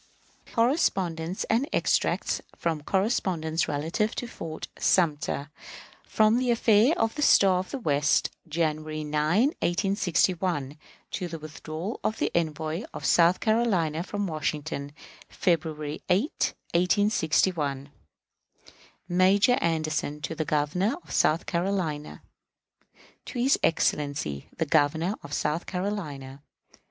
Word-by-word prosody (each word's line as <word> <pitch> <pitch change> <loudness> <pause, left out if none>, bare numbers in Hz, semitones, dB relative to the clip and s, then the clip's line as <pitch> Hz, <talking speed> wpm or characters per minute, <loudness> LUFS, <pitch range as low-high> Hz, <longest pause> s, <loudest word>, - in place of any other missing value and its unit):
Correspondence 190 - 0
and 250 +7 0
extracts - - +1
from 160 -3 -2
correspondence 170 -3 0
relative 165 +10 -1
to - - -3
Fort 160 -7 -7
Sumter, 150 -4 +1 0.6
from 220 +2 +3
the 255 -1 0
affair 230 +4 +4
of 225 0 +1
the 300 - -5
Star 195 -9 +5
of 185 - -5
the - - -4
West, 150 - +1 0.2
January 155 -1 -2
9, 155 - +2
1861, 175 -5 0 0.3
to 180 - -3
the 165 -1 -6
withdrawal 155 +5 -6
of 215 - -1
the - - 0
envoy 160 0 -1
of - - -6
South 170 +1 +4
Carolina 195 -9 +1
from 205 +3 -3
Washington, 155 -3 -3 0.4
February 155 -4 -1
8, 200 - +1 0.2
1861. 170 -6 +1 1.2
_Major 195 +7 +4
Anderson 155 -2 -1
to 155 - -3
the 160 - -2
Governor 155 - 0
of - - -14
South 160 +3 +2
Carolina. 170 -4 -2 1.0
To - - -7
his 260 +3 +3
Excellency 145 - 0
the 160 - 0
Governor 160 +4 +2
of 145 - -11
South 150 +3 -1
Carolina. 155 -9 -4
170 Hz, 115 wpm, -27 LUFS, 155-200 Hz, 1.2 s, Star